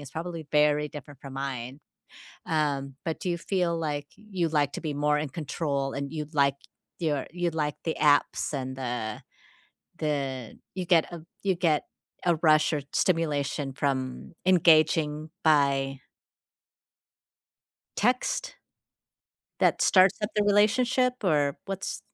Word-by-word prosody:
is 140 Hz, -2 st, -10 dB
probably 165 Hz, 0 st, -5 dB
very 150 Hz, 0 st, +3 dB
different 145 Hz, -2 st, -11 dB
from 135 Hz, -1 st, -9 dB
mine, 135 Hz, -1 st, -4 dB, 0.7 s
um, 140 Hz, -4 st, -1 dB
but 160 Hz, -2 st, -2 dB
do 180 Hz, -, -2 dB
you 170 Hz, -, 0 dB
feel 170 Hz, -1 st, 0 dB
like, 145 Hz, -3 st, -3 dB
you 190 Hz, -6 st, -2 dB
like 145 Hz, -2 st, +1 dB
to -, -, -5 dB
be 155 Hz, -3 st, -3 dB
more 150 Hz, +1 st, +2 dB
in 150 Hz, -1 st, -2 dB
control, 140 Hz, -2 st, -2 dB
and 140 Hz, 0 st, -4 dB
you 150 Hz, -2 st, -4 dB
like 140 Hz, -2 st, +3 dB, 0.4 s
your 150 Hz, -5 st, -1 dB
you 175 Hz, 0 st, -1 dB
like 150 Hz, -2 st, -2 dB
the 160 Hz, -, -1 dB
apps, 145 Hz, -1 st, +3 dB
and 130 Hz, -1 st, -3 dB
the 120 Hz, -4 st, -4 dB, 0.8 s
the 135 Hz, -6 st, -3 dB, 0.2 s
You 185 Hz, -, -2 dB
get 170 Hz, -2 st, +4 dB
a 170 Hz, -, -7 dB, 0.2 s
You 195 Hz, -2 st, +2 dB
get 165 Hz, -4 st, +2 dB, 0.4 s
a 175 Hz, -2 st, +4 dB
rush, 155 Hz, +1 st, +5 dB
or 150 Hz, -, 0 dB
stimulation, 150 Hz, -5 st, 0 dB
from 130 Hz, -1 st, -2 dB
engaging 155 Hz, -3 st, +4 dB, 0.2 s
by 140 Hz, -3 st, +3 dB, 2.0 s
text 245 Hz, +4 st, 0 dB, 1.0 s
that -, -, +3 dB
starts 185 Hz, 0 st, +5 dB
up 210 Hz, -, -1 dB
the 210 Hz, -, +3 dB
relationship, 240 Hz, +5 st, +3 dB
or, 145 Hz, -5 st, +2 dB
what's 195 Hz, -1 st, -4 dB
150 Hz, 135 wpm, -27 LUFS, 140-170 Hz, 2.0 s, rush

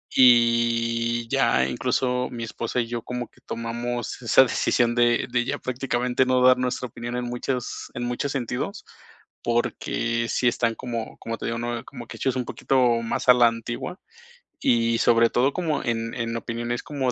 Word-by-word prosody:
y 115 Hz, -1 st, +4 dB
ya 65 Hz, -, +3 dB
incluso 125 Hz, -, 0 dB
mi 120 Hz, -1 st, -5 dB
esposa 115 Hz, +2 st, -3 dB
y -, -, -2 dB
yo 120 Hz, 0 st, -4 dB
como 125 Hz, -1 st, -5 dB
que -, -, -26 dB
tomamos 120 Hz, +2 st, -4 dB
esa 120 Hz, +2 st, +6 dB
decisión 120 Hz, -1 st, +1 dB
de 120 Hz, -1 st, +3 dB
de 120 Hz, 0 st, +2 dB
ya 140 Hz, +3 st, -2 dB
prácticamente 125 Hz, 0 st, 0 dB
no 130 Hz, 0 st, +3 dB
dar 125 Hz, 0 st, +6 dB
nuestra 125 Hz, 0 st, -2 dB
opinión 120 Hz, +1 st, -6 dB
en 125 Hz, -, -2 dB
muchas 125 Hz, +1 st, -4 dB
en 120 Hz, -, -3 dB
muchos 125 Hz, +3 st, -2 dB
sentidos, 125 Hz, -5 st, -3 dB, 0.6 s
porque 115 Hz, 0 st, -1 dB
sí 125 Hz, -, +1 dB
están 115 Hz, -1 st, +1 dB
como 115 Hz, -3 st, -5 dB
como 115 Hz, 0 st, -5 dB
te -, -, -4 dB
digo, 115 Hz, -, -2 dB
¿no?, 120 Hz, 0 st, -3 dB
como 125 Hz, -4 st, -9 dB
que -, -, -9 dB
hechos 130 Hz, -1 st, 0 dB
un 125 Hz, -, -2 dB
poquito 135 Hz, +3 st, 0 dB, 0.2 s
más 115 Hz, -, -3 dB
a -, -, +11 dB
la 120 Hz, -1 st, +6 dB
antigua, 120 Hz, -, -4 dB, 0.6 s
y 115 Hz, -1 st, +2 dB
sobre 115 Hz, 0 st, +4 dB
todo 130 Hz, +5 st, +2 dB
como 165 Hz, -5 st, -1 dB
en 115 Hz, -1 st, -2 dB
en 115 Hz, -1 st, -3 dB
opiniones 120 Hz, +1 st, -4 dB
como 135 Hz, -4 st, -1 dB
120 Hz, 175 wpm, -24 LUFS, 115-125 Hz, 0.6 s, a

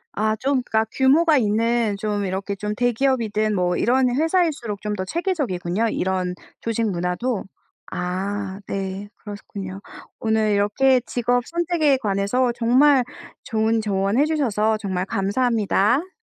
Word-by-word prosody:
아 215 Hz, +1 st, +1 dB
좀 265 Hz, +3 st, 0 dB
그러니까 220 Hz, -2 st, +1 dB
규모가 295 Hz, +4 st, +4 dB
있는 225 Hz, 0 st, +1 dB
좀 205 Hz, 0 st, -2 dB
이렇게 190 Hz, +2 st, -3 dB
좀 210 Hz, +1 st, -4 dB
대기업이든 230 Hz, -3 st, +1 dB
뭐 180 Hz, -1 st, +1 dB
이런 255 Hz, +2 st, +3 dB
회사일수록 305 Hz, -, 0 dB
좀 210 Hz, 0 st, -3 dB
더 185 Hz, -2 st, -3 dB
체계적이군요, 230 Hz, -, -1 dB
이런 185 Hz, -2 st, -1 dB, 0.3 s
조직 230 Hz, -1 st, -1 dB
문화도. 185 Hz, +6 st, -2 dB, 0.5 s
아 190 Hz, +2 st, -3 dB
네. 195 Hz, +1 st, -4 dB
그렇군요. 200 Hz, -2 st, -8 dB, 0.4 s
오늘 220 Hz, -1 st, +1 dB
이렇게 210 Hz, +6 st, +3 dB
직업 245 Hz, 0 st, +1 dB
선택에 335 Hz, -5 st, +1 dB
관해서 210 Hz, +3 st, 0 dB
정말 255 Hz, +3 st, +4 dB, 0.4 s
좋은 225 Hz, -1 st, +1 dB
조언 200 Hz, 0 st, 0 dB
해 290 Hz, -, +5 dB
주셔서 220 Hz, -9 st, +1 dB
정말 190 Hz, -4 st, -2 dB
감사합니다. 230 Hz, -, +1 dB
220 Hz, 295 characters per minute, -22 LUFS, 200-255 Hz, 0.5 s, 해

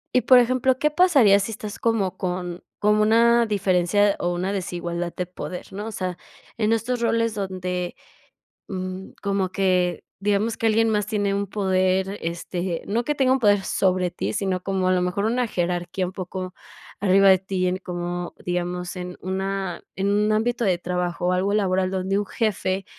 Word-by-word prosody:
y, 255 Hz, -, +5 dB
por 255 Hz, 0 st, +7 dB
ejemplo, 255 Hz, +1 st, +3 dB
¿qué 300 Hz, +3 st, +1 dB
pasaría 285 Hz, -, +5 dB
si 200 Hz, +3 st, -3 dB
estás 210 Hz, -1 st, -7 dB
como 220 Hz, -5 st, 0 dB
con 180 Hz, -1 st, -4 dB, 0.2 s
con 210 Hz, 0 st, +3 dB
una 230 Hz, +2 st, +4 dB
diferencia 200 Hz, -1 st, +2 dB
o 175 Hz, 0 st, 0 dB
una 180 Hz, +2 st, -2 dB
desigualdad 175 Hz, -2 st, -3 dB
de 180 Hz, -, -2 dB
poder, 180 Hz, 0 st, -7 dB
no? 205 Hz, +3 st, -5 dB
O -, -, -5 dB
sea, 185 Hz, -3 st, -3 dB, 0.4 s
en 220 Hz, 0 st, +2 dB
estos 240 Hz, +2 st, -1 dB
roles 230 Hz, -1 st, +1 dB
donde, 185 Hz, -3 st, -3 dB, 0.7 s
mm, 185 Hz, 0 st, -5 dB
como 200 Hz, -2 st, 0 dB
que, 180 Hz, -3 st, +1 dB, 0.2 s
digamos, 205 Hz, +2 st, 0 dB
que 230 Hz, -, 0 dB
alguien 225 Hz, +1 st, +3 dB
más 210 Hz, -2 st, +1 dB
tiene 205 Hz, -2 st, 0 dB
un 200 Hz, 0 st, -1 dB
poder, 190 Hz, 0 st, 0 dB
este, 175 Hz, +1 st, -3 dB
no 230 Hz, +3 st, 0 dB
que 295 Hz, -, 0 dB
tenga 265 Hz, -2 st, +3 dB
un 265 Hz, -, +3 dB
poder 205 Hz, -4 st, +3 dB
sobre 185 Hz, -2 st, +1 dB
ti, 175 Hz, -, -3 dB
sino 185 Hz, -2 st, -1 dB
como 190 Hz, -1 st, -1 dB
a 185 Hz, -, +3 dB
lo 180 Hz, -, +2 dB
mejor 180 Hz, +3 st, -1 dB
una 245 Hz, +2 st, +1 dB
jerarquía 175 Hz, +1 st, -2 dB
un 185 Hz, -, -7 dB
poco 185 Hz, -1 st, -5 dB, 0.5 s
arriba 195 Hz, 0 st, +5 dB
de 190 Hz, -, +6 dB
ti, 185 Hz, 0 st, -2 dB
en 185 Hz, -, -1 dB
como, 175 Hz, -1 st, -4 dB
digamos, 180 Hz, 0 st, -3 dB
en 180 Hz, 0 st, -6 dB
una 190 Hz, +1 st, -3 dB
en 195 Hz, +1 st, 0 dB
un 210 Hz, +1 st, +2 dB
ámbito 235 Hz, +2 st, +1 dB
de 185 Hz, -4 st, +3 dB
trabajo, 175 Hz, 0 st, -2 dB
o -, -, +2 dB
algo 190 Hz, +3 st, +1 dB
laboral 190 Hz, -2 st, +1 dB
donde 190 Hz, +1 st, 0 dB
un 205 Hz, -, -2 dB
jefe 195 Hz, -4 st, -1 dB
190 Hz, 185 wpm, -23 LUFS, 180-210 Hz, 0.7 s, por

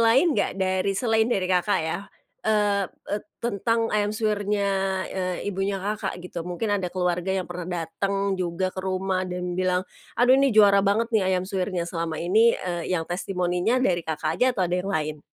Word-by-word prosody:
lain 250 Hz, +9 st, +5 dB
nggak 200 Hz, -5 st, 0 dB
dari 190 Hz, +1 st, 0 dB
selain 225 Hz, -1 st, +2 dB
dari 195 Hz, -6 st, +1 dB
Kakak 185 Hz, +1 st, +2 dB
ya, 160 Hz, -, -2 dB, 0.4 s
eee 205 Hz, -3 st, +1 dB
eee, 205 Hz, -, -5 dB, 0.2 s
tentang 230 Hz, 0 st, 0 dB
ayam 210 Hz, -1 st, +2 dB
suwirnya, 210 Hz, -2 st, 0 dB, 0.5 s
eee, 185 Hz, -1 st, -3 dB
ibunya 195 Hz, +1 st, -1 dB
Kakak 205 Hz, +1 st, -3 dB
gitu 175 Hz, -1 st, -6 dB
mungkin 180 Hz, +5 st, -2 dB
ada 180 Hz, -, -2 dB
keluarga 180 Hz, 0 st, -1 dB
yang 190 Hz, -1 st, 0 dB
pernah 175 Hz, 0 st, -6 dB, 0.2 s
dateng 195 Hz, +3 st, -1 dB
juga 185 Hz, 0 st, -1 dB
ke 185 Hz, -, -5 dB
rumah 185 Hz, 0 st, -1 dB
dan 180 Hz, 0 st, -3 dB
bilang, 185 Hz, 0 st, 0 dB, 0.3 s
"Aduh 255 Hz, +3 st, +5 dB
ini 275 Hz, -, +4 dB
juara 200 Hz, -2 st, +7 dB
banget 220 Hz, +4 st, +1 dB
nih 210 Hz, -4 st, +3 dB
ayam 180 Hz, -, -2 dB
suwirnya." 185 Hz, -2 st, -2 dB
Selama 165 Hz, -2 st, -3 dB
ini, 215 Hz, +8 st, +4 dB
eee, 180 Hz, 0 st, -2 dB
yang 165 Hz, -, -2 dB
testimoninya 180 Hz, +4 st, 0 dB
dari 185 Hz, -9 st, +2 dB
Kakak 160 Hz, 0 st, -3 dB
aja 255 Hz, -, +5 dB
atau 185 Hz, -, +2 dB
ada 175 Hz, +1 st, 0 dB
yang 195 Hz, -, -5 dB
lain? 155 Hz, -4 st, -1 dB
190 Hz, 180 wpm, -25 LUFS, 180-210 Hz, 0.5 s, juara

